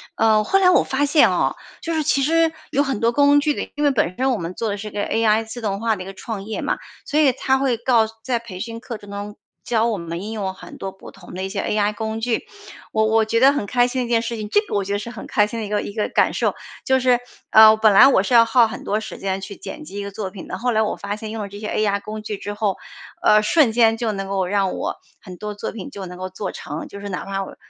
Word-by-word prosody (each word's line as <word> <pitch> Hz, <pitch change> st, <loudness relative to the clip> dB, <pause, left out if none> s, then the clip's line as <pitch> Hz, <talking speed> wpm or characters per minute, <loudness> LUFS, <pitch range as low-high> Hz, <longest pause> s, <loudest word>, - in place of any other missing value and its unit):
呃 220 Hz, -1 st, +4 dB
后 390 Hz, -, +2 dB
来 365 Hz, -, +5 dB
我 365 Hz, -, +5 dB
发 275 Hz, +2 st, 0 dB
现 295 Hz, +2 st, +5 dB
哦， -, -, +1 dB, 0.3 s
就 335 Hz, -, -3 dB
是 315 Hz, -1 st, 0 dB
其 280 Hz, -2 st, +2 dB
实 330 Hz, +2 st, +3 dB, 0.2 s
有 285 Hz, +2 st, +2 dB
很 270 Hz, -7 st, -2 dB
多 230 Hz, +1 st, +2 dB
工 285 Hz, +2 st, +5 dB
具 295 Hz, 0 st, -1 dB
因 295 Hz, -, -2 dB
为 285 Hz, -, +4 dB
本 195 Hz, -8 st, 0 dB
身 265 Hz, +1 st, +2 dB
我 245 Hz, -, 0 dB
们 170 Hz, 0 st, -5 dB
做 225 Hz, +3 st, -2 dB
的 205 Hz, -, -2 dB
是 210 Hz, +1 st, -7 dB
一 -, -, -7 dB
个 205 Hz, -, -3 dB
AI 225 Hz, 0 st, +2 dB
自 235 Hz, +2 st, -8 dB
动 200 Hz, -2 st, -2 dB
化 225 Hz, 0 st, +1 dB
的 185 Hz, -, -7 dB
一 -, -, -11 dB
个 195 Hz, -, -8 dB
创 200 Hz, 0 st, -6 dB
业 220 Hz, -, -4 dB
嘛， -, -, -1 dB, 0.3 s
所 300 Hz, -, 0 dB
以 290 Hz, -4 st, +5 dB
它 265 Hz, +1 st, +1 dB
会 265 Hz, -3 st, +1 dB
告 235 Hz, -2 st, +3 dB, 0.2 s
在 250 Hz, -2 st, 0 dB
培 210 Hz, -6 st, -9 dB
训 230 Hz, +2 st, -5 dB
课 235 Hz, -1 st, -7 dB
程 205 Hz, -, -14 dB
中 205 Hz, +1 st, -6 dB, 0.3 s
教 230 Hz, -1 st, +1 dB
我 220 Hz, -3 st, -1 dB
们 170 Hz, +1 st, -5 dB
应 215 Hz, -, -5 dB
用 200 Hz, -4 st, -3 dB
很 -, -, -12 dB
多 195 Hz, -, -5 dB
不 190 Hz, -, -13 dB
同 -, -, -14 dB
的 185 Hz, -, -4 dB
一 190 Hz, -, -3 dB
些 200 Hz, -, -2 dB
AI 210 Hz, 0 st, 0 dB
工 220 Hz, +1 st, -4 dB
具， 240 Hz, -1 st, -1 dB, 0.5 s
我 220 Hz, 0 st, +2 dB
我 220 Hz, 0 st, +3 dB
觉 230 Hz, +1 st, +1 dB
得 270 Hz, +3 st, +7 dB
很 285 Hz, -, -2 dB
开 245 Hz, +3 st, +3 dB
心 255 Hz, +1 st, -2 dB
的 -, -, -1 dB
一 -, -, -9 dB
件 230 Hz, -1 st, +3 dB
事 235 Hz, 0 st, -4 dB
情 210 Hz, -1 st, -5 dB
这 415 Hz, -, +4 dB
个 420 Hz, -, -6 dB
我 200 Hz, -, +1 dB
觉 200 Hz, -, -3 dB
得 205 Hz, -, 0 dB
是 235 Hz, -, -6 dB
很 -, -, -9 dB
开 210 Hz, -, +3 dB
心 230 Hz, +2 st, -5 dB
的 220 Hz, -, -3 dB
一 -, -, -7 dB
个 210 Hz, 0 st, 0 dB
一 -, -, -6 dB
个 215 Hz, -1 st, -1 dB
感 -, -, +2 dB
受。 -, -, 0 dB, 0.3 s
就 265 Hz, 0 st, +3 dB
是 250 Hz, -1 st, +3 dB, 0.3 s
呃， 220 Hz, 0 st, +8 dB
本 215 Hz, -1 st, +5 dB
来 195 Hz, -, +9 dB
我 200 Hz, -8 st, +4 dB
是 245 Hz, -, -2 dB
要 230 Hz, -1 st, +8 dB
耗 230 Hz, 0 st, +4 dB
很 220 Hz, -, -8 dB
多 210 Hz, +2 st, 0 dB
时 220 Hz, -, -8 dB
间 195 Hz, 0 st, -2 dB
去 195 Hz, +1 st, -7 dB
剪 -, -, -8 dB
辑 195 Hz, +5 st, -9 dB
一 -, -, -3 dB
个 200 Hz, -, -6 dB
作 195 Hz, -2 st, -5 dB
品 190 Hz, -2 st, -10 dB
的。 185 Hz, -, -5 dB
后 245 Hz, +4 st, 0 dB
来 220 Hz, -, +2 dB
我 215 Hz, -, 0 dB
发 200 Hz, 0 st, -4 dB
现 215 Hz, 0 st, -7 dB
用 220 Hz, -1 st, -4 dB
了 200 Hz, -, -6 dB
这 205 Hz, +1 st, -9 dB
些 210 Hz, -, -5 dB
AI 200 Hz, -2 st, 0 dB
工 215 Hz, 0 st, -7 dB
具 210 Hz, -2 st, -4 dB
之 205 Hz, -, -5 dB
后， 205 Hz, -2 st, -1 dB, 0.4 s
呃 210 Hz, 0 st, +5 dB
瞬 260 Hz, +1 st, +4 dB
间 225 Hz, -1 st, +4 dB
就 225 Hz, -2 st, -1 dB
能 195 Hz, -1 st, -4 dB
够 195 Hz, -1 st, 0 dB
让 195 Hz, -1 st, +1 dB
我 -, -, -3 dB, 0.3 s
很 185 Hz, -3 st, -10 dB
多 210 Hz, +2 st, -5 dB
作 205 Hz, -, -5 dB
品 205 Hz, -4 st, -8 dB
就 195 Hz, -1 st, -7 dB
能 180 Hz, -, -9 dB
够 185 Hz, 0 st, -5 dB
做 185 Hz, +2 st, -5 dB
成。 150 Hz, +2 st, -6 dB
就 200 Hz, -, -10 dB
是 205 Hz, -, -7 dB
哪 180 Hz, -, -4 dB
怕 195 Hz, 0 st, -3 dB
我 -, -, -10 dB
220 Hz, 325 characters per minute, -21 LUFS, 200-240 Hz, 0.5 s, 来